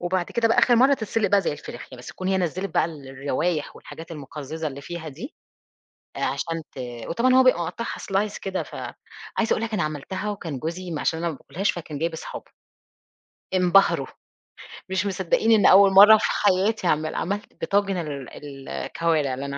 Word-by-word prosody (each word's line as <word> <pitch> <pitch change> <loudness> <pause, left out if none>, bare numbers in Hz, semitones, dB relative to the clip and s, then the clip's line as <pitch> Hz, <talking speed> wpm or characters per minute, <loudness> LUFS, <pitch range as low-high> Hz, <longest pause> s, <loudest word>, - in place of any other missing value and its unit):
وبعد 175 0 0
كده 230 -1 +2
بقى 225 - +2
آخر 240 -2 +5
مَرّة 265 +4 +5
تتسِلق 220 -3 -1
بقى 200 -1 +5
زي 175 - -1
الفراخ، 130 -3 -9
ي - - -8
بس 125 - -12
تكون 185 0 -5
هي 190 0 +2
نزّلِت 180 +1 -2
بقى - - +4
الروايح 145 +1 -3
والحاجات 165 +1 -11
المُقزّزة 150 +2 -6
اللي 140 0 -9
فيها 160 +1 -7
دي، 195 - -9 0.8
عشان 165 -1 -2
ت 135 - -11 0.3
وطبعًا 245 +9 +2
هو 260 0 +7
بيبقى 255 -9 +4
مقطّعها 230 +8 -5
slice 200 +2 -1
كده 190 -1 -3
ف - - -12 0.6
عايزة 225 - +2
أقول 225 - -2
لك 225 -1 -4
أنا 200 - +1
عملتها، 155 +7 -4
وكان 165 -9 -5
جوزي 175 +3 -5
ما 150 - -3
عشان 160 - 0
أنا 170 0 -1
ما 155 - -5
باكلهاش 185 +9 -2
فكان 155 -4 -7
جايب 165 +1 -1
اصحابه 160 - -8 1.0
انبهروا، 185 +2 +4 0.8
مش 190 +1 0
مصدّقين 195 +3 +1
إن 215 -2 +5
أول 195 0 +7
مَرّة 205 +3 +9
في - - -5
حياتي 200 0 +1
اعملها، 155 0 0
عَملت 200 +4 -4
طاجن 195 -1 +2
ال 140 -2 -7
الكوارِع 160 -5 -1
اللي 135 +2 -4
أنا 140 0 -4
175 Hz, 185 wpm, -24 LUFS, 155-200 Hz, 1.0 s, مَرّة